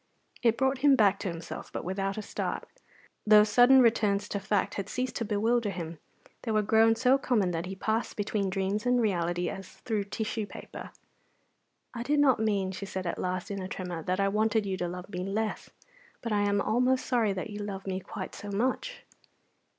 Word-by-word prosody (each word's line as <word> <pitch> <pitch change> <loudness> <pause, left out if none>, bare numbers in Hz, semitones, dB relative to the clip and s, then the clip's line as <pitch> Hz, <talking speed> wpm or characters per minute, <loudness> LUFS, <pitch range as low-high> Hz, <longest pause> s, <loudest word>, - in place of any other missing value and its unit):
It 230 -2 +3
brought 265 0 +1
him 280 0 +6
back 205 -5 +4
to 205 - -4
himself, 170 -1 -6
but - - -4
without 195 +2 -2
a 215 - -3
start. - - -4 0.6
Those 210 0 +7
sudden 250 +3 +7
returns 205 -3 +2
to 200 - -2
fact 200 0 0
had 200 0 -4
ceased 255 0 -2
to 230 - -2
bewilder 220 +2 +1
him; 170 -4 -6 0.4
they 235 - -5
were 215 -1 +2
grown 225 +2 +4
so 255 +3 +3
common 215 -9 +1
that 170 +1 -3
he 190 - -5
passed 220 +4 -2
between 205 -1 -1
dreams 195 +4 -1
and 245 0 +3
reality 175 -5 0
as 195 - -5
through 215 -4 -1
tissue 215 +1 -3
paper. - - -9 1.0
"I 235 - -5
did 290 +5 +1
not 270 -5 +4
mean," 200 -4 0
she 195 +1 -6
said 190 -1 -4
at 170 - -3
last, 185 +1 -3
in 200 -1 -3
a 185 - -4
tremor, 180 -3 -5
"that 185 +3 -1
I 195 - +3
wanted 215 +1 +1
you 195 -1 -1
to 180 - -2
love 180 +1 -6
me 180 -3 -6
less, 205 +4 -2 0.5
but 230 - -3
I 205 -1 +2
am 200 0 +2
almost 250 +4 +2
sorry 230 -5 +2
that 190 +3 -5
you 205 - -6
love 200 -2 -5
me 190 -1 -2
quite - - -7
so 205 - -8
much." 255 - -2
205 Hz, 205 wpm, -29 LUFS, 190-225 Hz, 1.0 s, Those